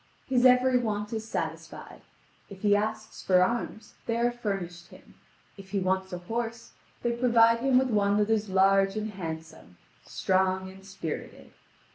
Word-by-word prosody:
His 255 -1 +4
every 250 0 +4
want 210 -2 -3
is 220 0 -5
satisfied: - - -6 0.5
if 190 -1 -11
he 205 -1 +4
asks 215 +1 -3
for 180 -1 +4
arms, 225 +1 -3
they 230 0 0
are 240 +1 +2
furnished 195 -7 -5
him: - - -17 0.4
if 195 -1 -12
he 200 - -1
wants 190 +1 -1
a 180 - -4
horse, 230 +5 -5 0.3
they 240 - +1
provide 235 -1 +4
him 260 +1 +3
with 260 -1 +2
one 205 -1 +2
that 210 +1 +1
is 215 -2 0
large 195 +1 +3
and 215 0 -3
handsome, 160 - -8 0.3
strong 190 0 0
and 190 0 -15
spirited. 190 -5 -7
205 Hz, 160 wpm, -28 LUFS, 190-230 Hz, 0.5 s, His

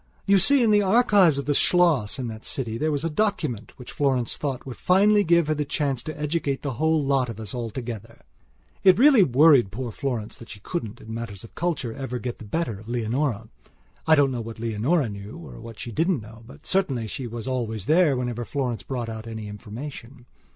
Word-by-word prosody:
You 195 0 +5
see, 270 +7 +4
in 225 - +4
the 205 0 +5
archives 200 - +4
of 140 - -3
the 145 - +1
Schloss 160 - +3
in 130 -2 -3
that 110 -1 -8
city 115 -5 -3
there 155 0 +1
was 145 +1 -1
a - - +2
document 155 - -2
which 125 - -10
Florence 130 -5 0
thought 135 -4 -4
would 130 -3 -7
finally 205 +3 +4
give 170 -1 +4
her 155 - +1
the 150 0 -1
chance 140 -3 -1
to 155 +3 -7
educate 150 -2 -1
the 140 -3 -2
whole 160 +4 +1
lot 135 -3 +1
of 115 -2 -7
us 110 -3 -6 0.2
together. 115 -2 -7 0.6
It 185 -2 +7
really 270 -2 +7
worried 140 - +5
poor 120 +2 -4
Florence 120 -5 -4
that 115 - -12
she 105 - -9
couldn't, 115 - -5
in 110 - -8
matters 115 -4 -6
of 115 - -13
culture, 155 -9 -2
ever 125 -1 -4
get 120 +1 -5
the 110 - -9
better 115 -3 -2
of 110 +2 -12
Leonora. 120 -1 -1 0.6
I 160 - +7
don't 140 -3 +3
know 120 -2 -3
what 115 0 -8
Leonora 115 +7 0
knew 100 +4 -8
or 170 -7 -10
what 115 -1 -10
she 120 - -6
didn't 165 - 0
know, 110 +2 -13
but - - -15
certainly 140 -12 0
she 120 +3 -5
was 115 0 -6
always 115 -6 -2
there 155 -2 +4
whenever 120 -1 -3
Florence 125 -2 -3
brought 125 -3 -4
out 110 0 -7
any 110 -2 -6
information. 120 +4 -9
130 Hz, 215 wpm, -25 LUFS, 115-160 Hz, 0.6 s, It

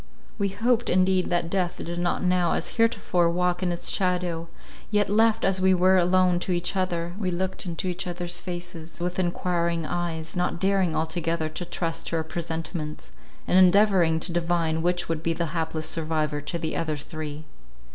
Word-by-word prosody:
We 200 - +2
hoped 235 +4 +1
indeed 185 0 +3
that 175 -1 +1
death 185 -3 0
did 175 +1 -4
not 175 +1 0
now 180 -2 +2
as - - -2
heretofore 205 -7 +2
walk 180 +1 0
in 180 -1 0
its 175 - -1
shadow; 180 -3 0 0.4
yet, 205 -2 +2
left 225 +1 +3
as 190 -1 +1
we 190 0 +5
were 185 +1 +4
alone 180 0 +3
to 185 - -3
each 175 +2 0
other, 175 -2 -1
we 190 -4 0
looked 185 +1 -2
in 170 -2 -5
each 180 -1 -2
other's 175 0 -1
faces 175 -2 -6
with 180 +1 -2
enquiring 170 -2 0
eyes, 165 -2 -3
not 180 -1 -1
daring 190 -3 +2
altogether 160 0 -1
to 175 +3 -6
trust 165 -1 -3
to - - -2
our 160 - 0
presentiments, 160 -1 -5 0.4
and 185 - +5
endeavouring 185 -3 +5
to 175 - -1
divine 165 -2 0
which 175 +1 0
would 165 -1 -2
be 165 0 0
the 165 -2 -2
hapless 160 -1 -2
survivor 155 -2 -1
to 160 +4 -3
the 160 -1 -3
other 155 -2 -1
three. 155 0 -6
175 Hz, 180 wpm, -26 LUFS, 165-185 Hz, 0.4 s, we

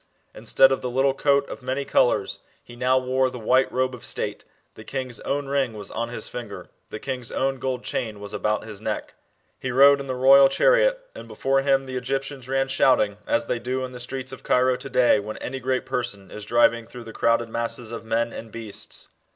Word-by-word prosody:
Instead 135 - +4
of 135 - 0
the 125 - -3
little 135 +2 +2
coat 140 0 +2
of - - -8
many 130 +2 -2
colours, 120 - +2 0.2
he 120 - -13
now 130 +1 +2
wore 130 0 +1
the 125 - -8
white 130 +3 +2
robe 130 0 0
of 125 - -10
state, - - -3 0.3
uhe - - -13
king's 130 -3 -4
own 140 0 -2
ring 135 -4 0
was 105 -2 -7
on 115 0 -3
his 120 - -5
finger, 120 -4 -8 0.2
the - - -6
king's 125 0 -5
own 135 0 -1
gold 130 -1 -3
chain 110 -3 -3
was 100 0 -7
about 105 0 -1
his 105 -3 -7
t - - -15
neck. - - -3 0.5
He 130 - -4
rod^ 140 +3 +6
in 140 - -6
the 130 - -2
royal 135 +2 +7
chariot, - - +3
and - - -10
before 135 0 0
him 135 -1 +2
the 130 -1 -5
Egyptians 135 0 -4
ran 135 0 +2
shcut 130 -3 +4
ing, 100 -1 -11
as 115 0 +1
they 120 - -2
do 130 +2 -2
in 130 - -8
the 125 - -9
streets 130 +2 -5
of 130 - -9
Cairo 125 0 +3
to 135 - -8
day 125 -4 +4
when 105 +1 -6
any 135 +1 -5
great 130 0 -1
person 105 -6 -4
is 105 -1 -7
driving 115 0 +3
through 120 0 -10
the 115 0 -10
crow^ 115 0 +2
masses 115 0 -3
of 115 - -6
men 115 +1 -1
and 115 -1 -8
beasts. 110 -2 -5
125 Hz, 225 wpm, -24 LUFS, 115-135 Hz, 0.5 s, royal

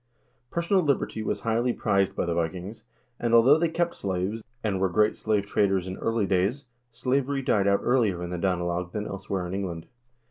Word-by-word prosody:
Personal 170 +3 +1
liberty 140 -7 0
was - - -2
highly 115 +2 +1
prized 100 -1 +1
by - - -1
the 85 - -1
Vikings, 90 +7 -4 0.3
and, 115 -1 +2
although 130 +7 +6
they 170 0 +2
kept 170 +1 0
slaves, 95 +3 -3 0.2
and 100 -4 0
were 95 - +2
great 105 +4 +2
slave 105 -2 0
traders 95 -2 +1
in 95 - -4
early 115 -2 0
days, 100 +10 0 0.3
slavery 135 +3 -1
died 100 -5 +2
out 100 0 +3
earlier 110 -9 +2
in 90 - -5
the 90 - -3
Danelag 90 -1 -1
than 105 -1 -3
elsewhere 95 -2 -4
in 90 - -5
England. 90 -4 -4
100 Hz, 185 wpm, -26 LUFS, 95-120 Hz, 0.3 s, although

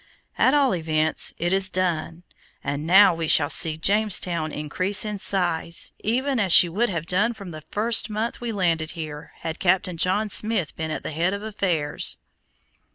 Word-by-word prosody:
At 260 - +3
all 280 -3 +2
events, 160 -2 -1
it 175 +2 -1
is 190 -1 +2
done, 175 -2 -3 0.4
and 145 +2 -4
now 190 +1 +6
we 165 -1 -4
shall 145 -1 +4
see 155 0 +3
Jamestown 180 -4 0
increase 180 +9 -1
in 210 -1 -4
size, 175 -4 0
even 260 +4 -1
as 195 -4 0
she 175 - +8
would 215 +8 -1
have 165 -4 -4
done 210 +7 0
from 200 -4 -10
the 155 -1 -9
first 220 +1 +2
month 220 +3 -4
we 240 -1 -4
landed 165 -6 -1
here 155 -1 -8
had 160 0 -5
Captain 180 -1 0
John 185 +5 0
Smith 210 -5 0
been 160 0 -5
at 155 - -5
the - - -5
head 170 +5 -1
of 200 - -8
affairs." 175 -9 -2
180 Hz, 175 wpm, -23 LUFS, 160-210 Hz, 0.4 s, she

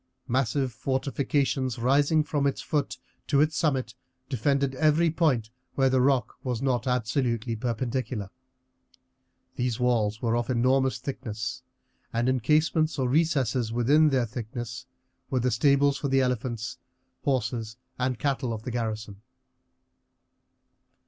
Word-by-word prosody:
Massive 130 +1 0
fortifications 135 +1 -1
rising 140 +6 +3
from 145 -2 0
its 140 - -1
foot 145 -3 -2 0.3
to 140 - +3
its 155 +2 +3
summit 135 -5 0 0.4
defended 140 +1 +1
every 155 +4 +3
point 135 -10 +1 0.2
where 135 -1 +3
the 130 -1 +3
rock 130 -1 +2
was 125 -4 -2
not 130 -1 0
absolutely 120 -2 0
perpendicular. 120 -2 -3 1.3
These 120 -2 -1
walls 110 -4 +1
were 115 -2 0
of 120 +1 -1
enormous 130 +2 +2
thickness, 125 -2 -5 0.5
and 120 +1 0
in 130 0 +2
casemates 155 +5 +2
or 130 -2 +1
recesses 130 -5 +1
in 140 +7 +4
their 130 -4 +2
thickness 120 +2 -6 0.4
were 130 - +1
the 125 +1 +1
stables 140 +4 +3
for 140 - -1
the 135 0 +3
elephants, 120 -3 -2 0.4
horses, 115 -4 -1 0.2
and 125 -1 0
cattle 135 -3 -1
of 110 -1 -6
the 125 - -4
garrison. 110 -3 -4
130 Hz, 130 wpm, -27 LUFS, 115-140 Hz, 1.3 s, in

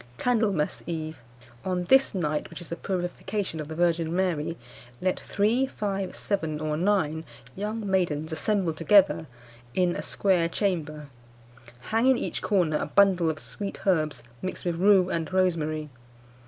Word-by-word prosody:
"Candlemas 215 -10 +1
Eve. 160 -3 -4 0.4
On 180 -1 -1
this 265 +4 +4
night 150 -4 -1
(which - - -9
is 175 - -10
the 170 - -3
purification 185 0 -3
of 150 - -5
the 160 - -6
Virgin 170 -1 +1
Mary), 170 -4 0 0.4
let 185 0 0
three, 225 +6 +1
five, 195 -6 -3
seven, 160 -7 -2
or 155 0 -1
nine 160 -3 +1 0.3
young 210 +2 -3
maidens 170 -5 0
assemble 190 0 0
together 170 0 +4 0.5
in 180 -2 +2
a - - -3
square 180 -4 +1
chamber. 155 -6 -2 0.9
Hang 225 +3 +3
in 265 -1 +5
each - - -3
corner 175 -7 +2
a - - -3
bundle 180 +1 +4
of 155 - -2
sweet 200 +5 -7
herbs, 155 -6 +1 0.2
mixed 185 - -5
with 170 -2 -1
rue 190 0 +5
and 165 0 -2
rosemary. 155 -5 0
180 Hz, 150 wpm, -27 LUFS, 160-200 Hz, 0.9 s, in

